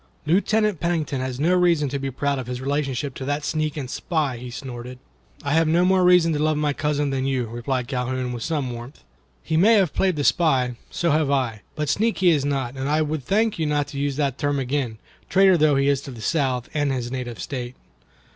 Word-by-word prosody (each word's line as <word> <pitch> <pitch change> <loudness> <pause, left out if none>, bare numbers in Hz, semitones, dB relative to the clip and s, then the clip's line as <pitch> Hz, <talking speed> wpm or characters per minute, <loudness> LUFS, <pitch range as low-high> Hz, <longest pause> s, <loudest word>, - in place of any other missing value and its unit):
"Lieutenant 205 +3 +2
Pennington 160 -5 -1
has 130 -1 -4
no 165 +5 +3
reason 175 -5 +3
to 140 +1 -3
be 135 0 -3
proud 140 +1 -1
of 125 - -6
his 125 0 -4
relationship 140 0 -2
to 130 - -6
that 145 +1 -2
sneak 155 -1 -1
and 135 -3 -4
spy," 145 -2 -2
he 125 +1 -8
snorted. 125 0 -7 0.5
"I 140 - -1
have 165 0 +3
no 170 +3 +3
more 190 0 +3
reason 180 -2 +5
to 150 - -1
love 155 0 +1
my 150 -1 +1
cousin 150 -1 -1
than 135 -1 -1
you," 130 -3 0
replied 120 +2 -3
Calhoun, 125 -1 -2
with 120 - -5
some 145 -3 -2
warmth. 120 - -10 0.4
"He 160 - 0
may 215 +7 +6
have 190 -7 +2
played 190 -3 +1
the 145 - -1
spy; 135 -7 +2 0.2
so 170 -1 0
have 155 -1 +2
I; 125 -6 0
but 150 0 -2
sneak 220 +10 +1
he 180 -2 +4
is 145 -4 +2
not, 135 -3 -2
and 135 +1 -2
I 155 +1 +2
would 150 -2 -3
thank 215 - +1
you 160 - 0
not 145 -1 0
to 140 - -6
use 140 -1 -1
the 140 -1 +1
term 145 0 -1
again, 130 -3 -2 0.3
traitor 190 0 +5
though 155 -3 +4
he 140 0 +2
is 140 -1 +2
to 140 - -9
the 120 -3 -9
South 130 -2 0
and 145 -2 +1
his 125 -2 -3
native 125 -3 -5
state." 125 -2 -5
145 Hz, 230 wpm, -23 LUFS, 130-155 Hz, 0.5 s, may